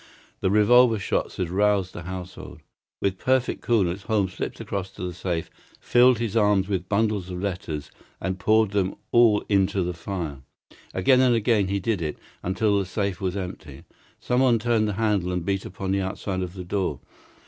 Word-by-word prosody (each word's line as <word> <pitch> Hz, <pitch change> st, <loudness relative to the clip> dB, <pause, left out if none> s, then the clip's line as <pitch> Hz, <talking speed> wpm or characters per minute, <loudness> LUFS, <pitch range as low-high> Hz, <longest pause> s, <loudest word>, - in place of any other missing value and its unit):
The 95 Hz, -, +1 dB
revolver 115 Hz, +3 st, +5 dB
shots 100 Hz, -, -2 dB
had 90 Hz, -2 st, -2 dB
roused 100 Hz, -1 st, +2 dB
the -, -, -7 dB
household. 90 Hz, +1 st, -8 dB, 0.4 s
With 95 Hz, -1 st, 0 dB
perfect 130 Hz, -1 st, +1 dB
coolness 100 Hz, -5 st, +1 dB
Holmes 100 Hz, -3 st, 0 dB
slipped -, -, -5 dB
across 95 Hz, -2 st, -4 dB
to -, -, -8 dB
the 90 Hz, -1 st, -3 dB
safe, 85 Hz, -1 st, -3 dB, 0.3 s
filled 125 Hz, 0 st, +4 dB
his 115 Hz, -3 st, -2 dB
two 115 Hz, -, +3 dB
arms 105 Hz, -2 st, +3 dB
with 95 Hz, -3 st, -2 dB
bundles 105 Hz, -3 st, 0 dB
of 90 Hz, -1 st, -5 dB
letters, 90 Hz, -6 st, -4 dB, 0.3 s
and 95 Hz, 0 st, -3 dB
poured 110 Hz, +1 st, +3 dB
them 100 Hz, -2 st, 0 dB, 0.2 s
all 115 Hz, -3 st, +5 dB
into 100 Hz, -1 st, +2 dB
the 90 Hz, 0 st, -2 dB
fire. 85 Hz, -5 st, -5 dB, 0.6 s
Again 125 Hz, +8 st, +4 dB
and 125 Hz, -2 st, +4 dB
again 110 Hz, -3 st, +2 dB
he 100 Hz, +1 st, -1 dB
did 100 Hz, -1 st, -1 dB
it, 75 Hz, -2 st, -3 dB, 0.2 s
until 100 Hz, +2 st, +1 dB
the 100 Hz, -, -1 dB
safe 100 Hz, -1 st, -2 dB
was 95 Hz, 0 st, -1 dB
empty. 90 Hz, -2 st, -7 dB, 0.4 s
Someone 125 Hz, -1 st, +3 dB
turned 115 Hz, -1 st, +1 dB
the 105 Hz, -, -1 dB
handle 100 Hz, -4 st, 0 dB
and 90 Hz, -2 st, -2 dB
beat 95 Hz, 0 st, -1 dB
upon 95 Hz, +1 st, -4 dB
the 100 Hz, 0 st, +1 dB
outside 95 Hz, 0 st, -3 dB
of 90 Hz, -1 st, -4 dB
the 90 Hz, -, -6 dB
door. 90 Hz, -6 st, -2 dB
100 Hz, 185 wpm, -25 LUFS, 90-110 Hz, 0.6 s, revolver